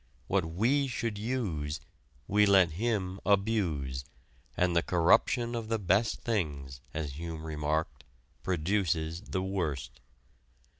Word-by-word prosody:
What 95 +3 +1
we 120 - +2
should 115 -4 -3
use, 95 - -2 0.5
we 105 +1 +4
let 95 -4 +6
him 95 0 -1
abuse, 90 -11 +1 0.5
and 90 -1 +2
the 85 - +5
corruption 115 +8 +3
of 115 -2 -3
the 115 - +2
best 100 +3 +1
things, 70 - -2
as 75 -3 -3
Hume 80 -2 -5
remarked, 75 -3 -2 0.4
produces 85 -2 0
the 95 -3 -3
worst. 85 -9 -3
90 Hz, 115 wpm, -30 LUFS, 80-105 Hz, 0.5 s, let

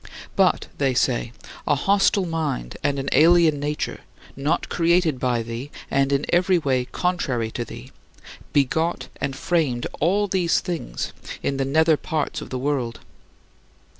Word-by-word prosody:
But - - +3
[they 135 -3 +1
say] 120 -2 +1 0.4
a - - +4
hostile 195 +4 +3
mind 155 - -3
and 140 - +1
an 135 0 -3
alien 160 0 +5
nature 150 +1 -3 0.4
not 145 +5 0
created 170 -4 +2
by 120 -2 0
thee 115 +5 -6 0.2
and 135 0 +2
in 140 +1 +1
every 180 +1 +3
way 130 -6 0
contrary 130 -9 -1
to 120 - -3
thee - - -10 0.6
begot 160 +5 +1
and 135 -1 -3
framed 140 -6 0
all 200 +6 +2
these 180 -3 +2
things 165 - -4 0.3
in 135 - 0
the 135 - 0
nether 160 +3 +3
parts 155 0 -2
of - - -8
the 130 - -3
world. 130 -3 -2
145 Hz, 145 wpm, -23 LUFS, 130-170 Hz, 0.6 s, alien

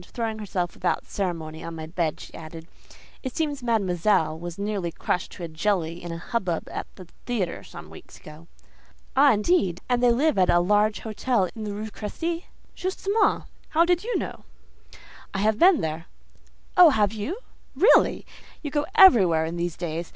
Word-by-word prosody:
Throwing 220 +2 -4
herself 185 -4 -3
without - - -1
ceremony 165 -5 -4
on 165 - -6
my 160 -1 -6
bed 165 -1 -2
she - - -11
added, 160 0 -10 0.5
"It 260 -3 -6
seems 295 -4 -2
Mademoiselle 190 -7 +1
was 175 0 -7
nearly 200 -4 -2
crushed 180 +2 -2
to 175 - -9
a - - -3
jelly 170 0 -1
in 175 - -6
a 165 - -4
hubbub 180 -2 -3
at - - -5
the 185 - -11 0.2
theatre 210 -9 -2
some - - -11
weeks - - -13
ago." 155 +2 -13 0.7
"Ah! 280 +1 +6
indeed. 210 - +1
And 245 -1 +1
they 245 - +5
live 280 0 +2
at 185 - +3
a 175 - +5
large 210 +4 +2
hotel 220 -3 0
in 220 -1 -6
the 205 - -4
Rue 215 +1 -5
Crécy?" 330 - -4 0.3
"Justement. 395 +3 0 0.3
How 330 +2 +3
do 355 +1 +4
you 480 +2 -1
know?" - - -6 0.9
"I - - 0
have 215 +2 +1
been 360 -2 +6
there." 160 +1 -4 0.7
"Oh, 360 - +9 0.3
you 220 - -4
have? - - -5 0.4
Really! 420 - +4 0.4
You 290 - -4
go 295 0 -1
everywhere 190 - +7
in 165 +2 -4
these 170 -1 -3
days. 170 -1 -4
200 Hz, 175 wpm, -25 LUFS, 170-245 Hz, 0.9 s, Oh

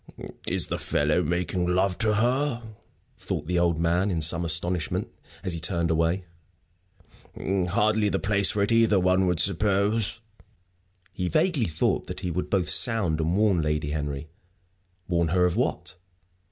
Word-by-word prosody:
"Is - - 0
the - - -4
fellow - - 0
making 90 +1 -2
love 90 +1 0
to 110 -1 +2
her?" 120 +3 0 0.6
thought 75 - -4
the 90 +2 0
old 85 -2 +1
man, 85 +4 +1
in 85 -4 -1
some 80 +2 +3
astonishment, 85 0 0 0.3
as 90 - -1
he 85 - -3
turned 85 +1 0
away. 85 +3 0 1.1
"Hardly 100 +3 0
the 95 - 0
place 100 0 +1
for 100 - 0
it 100 - -1
either, 115 -3 +3
one 90 +1 +2
would 90 -2 0
suppose." 105 +3 +1 0.9
He 90 -1 -3
vaguely 155 - +1
thought 80 -1 -1
that - - -7
he 90 -3 -3
would 90 +2 -3
both 95 -3 0
sound 95 -10 +3
and 85 +4 0
warn 100 -5 +2
Lady 75 -1 -2
Henry. 75 -1 -4 0.8
Warn 85 -2 +1
her 90 +2 +2
of 90 - 0
what? - - -2
90 Hz, 155 wpm, -25 LUFS, 85-105 Hz, 1.1 s, some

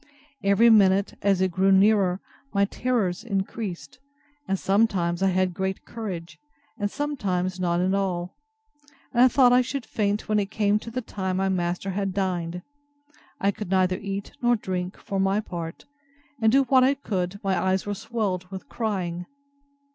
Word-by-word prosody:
Every 200 +4 +5
minute, 195 -2 +4
as 195 -2 +2
it 190 -1 +2
grew 190 +3 +2
nearer, 195 -1 +4 0.3
my 200 0 +4
terrors 210 -5 -1
increased; 200 -1 -4 0.5
and 195 - 0
sometimes 190 -4 +1
I 195 - +3
had 185 -1 +1
great 190 +1 -3
courage, 175 -8 -6 0.4
and 205 0 0
sometimes 185 -11 -2
none 175 -1 +1
at 185 +1 +1
all; 180 -2 -2 0.8
and 240 - +3
I - - +8
thought 250 -1 +5
I 250 - +6
should 260 0 -4
faint 210 -1 -1
when 215 -1 +2
it 200 -1 -2
came 210 -1 +1
to 230 - -8
the 250 +2 -4
time 190 -3 -3
my 195 0 +1
master 180 +1 -1
had 195 0 -2
dined. 180 -3 -2 0.8
I 200 - +2
could 205 -2 -7
neither 185 -1 +2
eat 200 0 -5
nor 240 0 +4
drink, 185 -3 -4
for 195 -1 -4
my 195 +2 +2
part; 170 -6 -6 0.6
and 220 0 +4
do 275 +2 +5
what 260 0 +4
I 270 +2 +4
could, 195 -7 -3
my 195 -1 +1
eyes 190 0 +1
were 205 - -2
swelled 200 -4 -3
with 190 -1 -8
crying. 180 -6 -3
195 Hz, 170 wpm, -25 LUFS, 185-215 Hz, 0.8 s, I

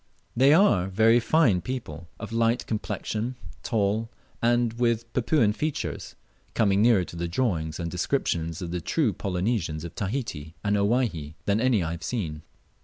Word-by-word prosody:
They 135 +4 +5
are 155 - +4
very 110 +5 +4
line 130 - +4
people, 85 - -6
of 110 0 -7
light 115 +1 +1
complexion, 110 +2 -3 0.3
tall, 110 0 0 0.3
and 120 -1 +2
with 115 -1 -1
Papuan 120 -3 +2
features, 150 +6 -4 0.4
coming 100 -3 +3
nearer 110 -5 +5
to - - -10
the 85 0 -2
drawings 85 -7 -1
and 85 -1 -3
descriptions 85 - -1
of 85 - -5
the 90 0 -3
true 135 - +1
Polynesians 90 -4 -2
of 85 0 -7
Tahiti 95 - -4
and 105 0 +1
Owyhee 100 - 0
than 105 +2 +1
any 125 -7 +3
I 80 - -2
have 85 0 -6
seen. 80 -11 -3
105 Hz, 155 wpm, -26 LUFS, 85-120 Hz, 0.4 s, They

